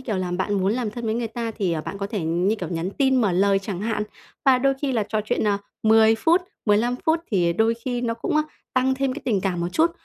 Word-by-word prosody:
kiểu, 230 -6 -3
là 185 -1 -2
bạn 190 +3 -1
muốn 195 +1 +1
làm 235 -3 -2
thân 235 +2 -7
với 220 0 0
người 235 -1 -2
ta 230 0 -4
thì, 195 -6 -1
ờ, 160 - -1
bạn 195 +5 -6
có 200 - -2
thể 205 -1 -3
như, 175 +6 +1
kiểu, 180 -6 -5
nhắn 170 +2 -3
tin 265 +4 +2
mở 200 -5 +2
lời 195 +2 +3
chẳng 195 -2 -5
hạn. 215 0 -1 0.4
Và 260 -2 +5
đôi 275 +1 +2
khi 275 - 0
là 225 -3 +1
trò 215 -1 0
chuyện, 220 -1 0
à, 200 -1 +2 0.2
10 220 0 +5
phút, 325 +10 +3 0.3
15 225 +4 +2
phút 320 +1 +3
thì 175 -5 +2
đôi 225 +5 +2
khi 245 -2 -1
nó 235 -2 -1
cũng, 230 +6 -2
a, 305 - +4 0.3
tăng 260 +1 +2
thêm 270 -1 -1
cái 295 - -7
tình 215 -6 +1
cảm 180 -3 -1
một 175 - -1
chút, 325 - +3
220 Hz, 275 wpm, -23 LUFS, 195-245 Hz, 0.4 s, Và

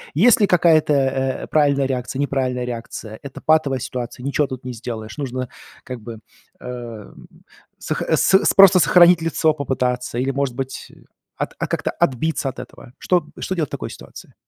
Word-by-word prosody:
есть 230 - +5
ли 205 - +5
какая-то, 165 -4 +4
э, 135 -1 0
правильная 140 -2 +2
реакция, 130 0 -3
неправильная 130 -3 -1
реакция? 115 -2 -7
Это 140 -2 -9
патовая 155 -4 +2
ситуация, 125 0 -6
ничего 140 +1 0
тут 130 -1 -7
не 125 - -5
сделаешь, 110 -1 -7
нужно 130 -3 -4 0.3
как 125 -2 -7
бы, 115 0 -9 0.4
э, - - -12
м, 120 -4 -9 0.5
сох - - -3
с - - +2
с - - +4
просто 195 -2 +8
сохранить 175 0 +6
лицо 160 -1 +1
попытаться 125 -4 -2
или, 130 +2 0
может 135 -2 -2
быть, 135 0 -6 0.5
от - - -3
а, - - -1
как-то - - -2
отбиться 140 +2 0
от 130 - -9
этого. 120 - -12
Что 175 -4 +1
что 185 - -3
делать 155 -6 -1
в - - -40
такой - - -5
ситуации? - - -12
135 Hz, 175 wpm, -21 LUFS, 125-155 Hz, 0.5 s, просто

